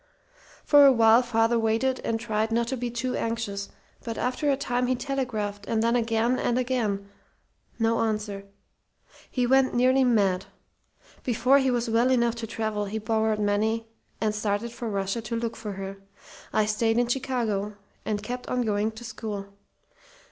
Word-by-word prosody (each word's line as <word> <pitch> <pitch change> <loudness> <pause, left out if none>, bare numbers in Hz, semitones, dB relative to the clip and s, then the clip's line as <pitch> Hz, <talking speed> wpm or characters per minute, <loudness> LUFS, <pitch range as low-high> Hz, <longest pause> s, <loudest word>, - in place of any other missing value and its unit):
"For 290 -1 +7
a - - +8
while 230 -1 +6
father 230 -1 +2
waited 230 +4 +1
and 225 0 -1
tried 220 -1 -1
not 235 +1 +1
to 265 - -1
be 245 -1 -3
too 240 +2 -2
anxious; 215 -4 -3 0.3
but 230 -1 -5
after 255 +4 -1
a 275 - +2
time 250 -2 -1
he 255 - +2
telegraphed, 240 -7 -3
and 220 -1 +1
then 235 +1 +2
again 230 +1 +1
and 240 - +1
again. 230 -6 -1 0.7
No 225 0 +1
answer. 210 -3 -2 0.8
He 250 -1 0
went 265 +1 +3
nearly 255 +2 +4
mad. 200 -7 +2 0.8
Before 250 +3 +3
he 265 -1 +2
was 240 -1 0
well 230 +2 +3
enough 235 -2 +3
to 230 -1 -5
travel 215 -2 -2
he 205 +2 -4
borrowed 220 0 0
money 215 +2 +1 0.3
and 215 -1 0
started 210 +2 -1
for 235 -1 -5
Russia 195 +2 -2
to 225 +1 -4
look 230 0 -2
for 210 -2 -6
her. 195 0 -6 0.5
I 215 - +2
stayed 225 +2 +1
in 245 - +3
Chicago 235 -5 -1 0.3
and 210 -1 -2
kept 250 +3 -5
on 250 -1 0
going 215 0 0
to 220 +2 -10
school. 205 -4 -6
225 Hz, 170 wpm, -26 LUFS, 215-245 Hz, 0.8 s, a